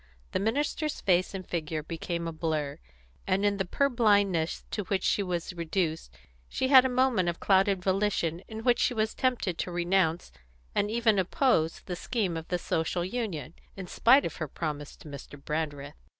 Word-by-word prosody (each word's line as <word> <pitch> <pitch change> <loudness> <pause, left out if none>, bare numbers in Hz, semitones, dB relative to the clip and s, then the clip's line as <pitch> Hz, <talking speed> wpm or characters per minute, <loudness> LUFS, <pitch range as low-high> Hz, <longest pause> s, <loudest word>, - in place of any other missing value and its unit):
The - - 0
minister's 290 +8 -1
face 185 +1 +1
and 185 -2 -6
figure 155 -2 -3
became 170 +1 -4
a - - -3
blur, 155 -3 -2 0.5
and 195 +2 +1
in 200 -1 +2
the 195 - -1
purblindness 205 - +2
to 210 - -2
which 190 0 -1
she - - +2
was 180 -2 -3
reduced 165 - -2 0.4
she 260 - -1
had 260 -2 +9
a - - +2
moment 250 -8 +2
of 170 - -4
clouded 190 -1 +3
volition 190 -4 0
in 220 0 -7
which 240 -1 +3
she 245 - +1
was 220 0 0
tempted 245 -9 -1
to 180 - -2
renounce, 175 -1 +1 0.4
and 205 - +1
even 225 -2 +2
oppose, 180 - +1
the 180 - -5
scheme 200 -1 -2
for 165 -1 -5
a 180 - +1
Social 170 +1 -1
Union, 185 - -4 0.2
in 190 - -5
spite 250 +9 +4
of - - -4
her 155 - -3
promise 150 -1 -5
to - - -14
Mr. 145 0 -9
Brandreth. 145 -1 -4
185 Hz, 180 wpm, -28 LUFS, 165-215 Hz, 0.5 s, had